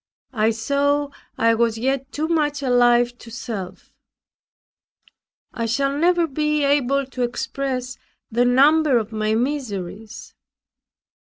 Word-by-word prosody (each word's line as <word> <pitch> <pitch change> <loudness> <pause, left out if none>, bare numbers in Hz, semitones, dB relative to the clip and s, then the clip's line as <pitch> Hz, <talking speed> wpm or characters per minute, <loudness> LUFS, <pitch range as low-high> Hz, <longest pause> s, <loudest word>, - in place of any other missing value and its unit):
I 220 -1 +2
saw 280 +5 0 0.3
I 230 0 +3
was 230 0 +1
yet 270 +3 -2
too 310 +3 -2
much 295 -4 0
alive 245 -1 +3
to 230 - -12
self. 210 -6 -7 1.6
I 230 -1 -2
shall 275 +4 0
never 345 +3 +2
be 300 0 -1
able 275 -1 +2
to 255 -1 -7
express 255 +1 -3 0.3
the 240 +2 +2
number 280 +2 +4
of 225 -1 -3
my 215 0 -1
miseries. 220 -6 -4
255 Hz, 115 wpm, -21 LUFS, 230-285 Hz, 1.6 s, number